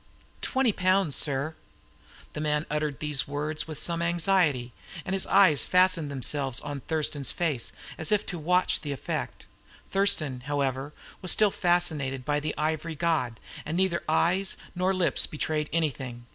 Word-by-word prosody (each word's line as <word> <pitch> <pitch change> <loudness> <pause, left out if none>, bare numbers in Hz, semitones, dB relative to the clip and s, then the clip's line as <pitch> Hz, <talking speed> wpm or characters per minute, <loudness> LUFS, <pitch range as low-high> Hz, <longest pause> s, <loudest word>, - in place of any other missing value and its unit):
"Twenty 265 -3 +2
pounds, 185 -5 +2
sir." 145 +2 +1 0.8
The 150 - -4
man 150 0 0
uttered 150 -2 -1
these 150 -3 0
words 150 +2 -3
with 155 -2 -6
some 170 +2 0
anxiety, 170 -8 +2 0.3
and 190 - -3
his 195 - -1
eyes 165 -8 +5
fastened 180 -4 +3
themselves 135 -1 -1
on 145 -1 -5
Thurston's 145 -2 -1
face, 150 -9 -1 0.3
as 160 - +1
if 210 -1 +2
to 175 - -4
watch 180 +4 +2
the 145 -2 -3
effect. 135 - -5 0.5
Thurston, 155 -10 +2
however, 140 -1 -1 0.3
was 185 - 0
still 210 -2 +4
fascinated 155 -9 0
by 145 0 +1
the 155 +1 -4
ivory 155 +1 -2
god, 145 -9 0 0.2
and 160 +3 -3
neither 185 -2 +1
eyes 185 +4 +2 0.2
nor 185 +1 +1
lips 185 -2 +2
betrayed 150 0 -2
anything. 130 -7 -2
155 Hz, 150 wpm, -27 LUFS, 145-175 Hz, 0.8 s, eyes